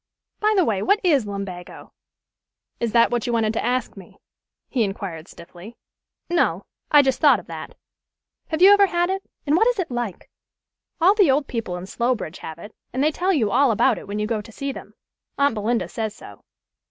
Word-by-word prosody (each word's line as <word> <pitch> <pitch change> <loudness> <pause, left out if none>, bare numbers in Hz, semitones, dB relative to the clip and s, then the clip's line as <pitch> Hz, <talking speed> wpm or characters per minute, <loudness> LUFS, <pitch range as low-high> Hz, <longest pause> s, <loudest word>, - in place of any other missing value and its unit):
By 430 0 +2
the 365 - +4
way, 200 -4 0
what 405 - +2
is 285 - +2
lumbago?" 195 -3 -7 0.9
"Is 235 -2 -1
that 230 +1 +4
what 240 -1 -1
you 240 - -1
wished 220 -2 +1
to - - -2
ask 250 0 -1
me?" 190 -3 -14 0.5
he 245 -4 0
inquired 195 -5 -5
stiffly. 175 +6 -13 0.5
"No. 345 -1 0 0.2
I 295 -1 +6
just 265 -2 0
thought 280 -8 +5
of - - -14
that. 160 -1 -9 0.7
Have 320 +1 0
you 390 - +9
ever 405 -1 +6
had 350 0 0
it? 385 0 -2 0.2
and 295 +1 +2
what 445 +7 +4
is - - +1
it 360 -8 -3
like? 240 -6 -4 0.7
All 360 +4 +5
the 405 -7 +4
old 280 +2 +2
people 225 -9 -4
in 180 - -7
Slowbridge 230 -4 -2
have 160 - -8
it, 205 +5 -11 0.2
and 260 +2 -1
they 305 - +3
tell 365 +5 0
you 230 - +1
all 270 +4 +4
about 220 - +2
it - - -13
when 205 +1 -4
you 210 - -1
go 220 -1 -2
to 215 - -14
see 275 +5 -4
them. - - -11 0.4
Aunt 280 -2 +3
Belinda 225 +2 -1
says 220 -2 -4
so. 100 - -14
240 Hz, 205 wpm, -22 LUFS, 205-310 Hz, 0.9 s, you